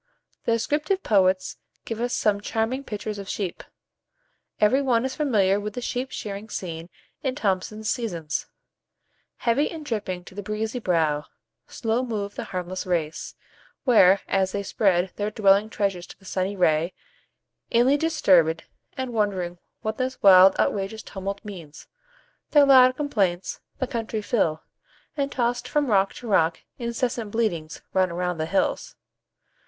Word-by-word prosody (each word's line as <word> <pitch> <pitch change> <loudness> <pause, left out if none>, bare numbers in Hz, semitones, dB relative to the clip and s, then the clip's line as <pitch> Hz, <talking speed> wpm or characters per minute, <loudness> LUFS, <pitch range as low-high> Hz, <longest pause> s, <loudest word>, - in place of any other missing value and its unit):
The 230 - +2
descriptive 300 - 0
poets 190 -3 +2 0.3
give 225 0 -4
us 245 0 -1
some 205 -2 +1
charming 225 +6 -1
pictures 210 -3 -5
of 195 - -8
sheep. 190 -4 -3 1.0
Every 250 +6 +4
one 250 -3 +2
is 265 - -3
familiar 205 -10 +2
with 210 0 -5
the - - -2
sheep 250 +2 -3
shearing 210 -2 -6
scene 165 -3 -5 0.3
in 260 -2 -1
Thomson's 215 -2 -2
"Seasons:" 175 -12 -2 0.9
"Heavy 260 +6 +1
and 320 -3 -8
dripping, 190 -7 -3
to 180 - -13
the 205 - -5
breezy 215 +4 -3
brow 160 -7 +1 0.4
Slow 225 +2 -1
move 210 -4 -3
the - - -5
harmless 185 -1 -5
race; 160 -3 -2 0.5
where, 200 -6 +6
as 190 -1 +1
they 200 - -2
spread 190 -3 +1
Their 205 0 -1
dwelling 205 0 +3
treasures 195 -5 -2
to - - -13
the 190 - -22
sunny 190 +1 -2
ray, 165 -1 +2 0.7
Inly 245 +4 +4
disturb'd, 185 - +3 0.3
and 260 -2 -3
wond'ring 190 -5 -1 0.2
what 220 +2 -3
this 260 0 -2
wild 190 -1 +8
Outrageous 200 +2 -1
tumult 200 +2 -6
means, 170 -8 -9 0.6
their 290 -2 +6
loud 255 -2 +7
complaints 200 -11 -1 0.2
The 260 - -1
country 225 -4 -3
fill; 170 -9 0 0.5
and, 280 -2 -1
toss'd 240 -1 -1
from 290 -5 0
rock 195 -1 +3
to 240 - -9
rock, 165 -5 +2 0.2
Incessant 235 -2 -2
bleatings 185 -8 -2
run 185 -1 +3
around 175 0 -2
the 155 - -1
hills." 290 - -1
205 Hz, 150 wpm, -25 LUFS, 185-240 Hz, 1.0 s, wild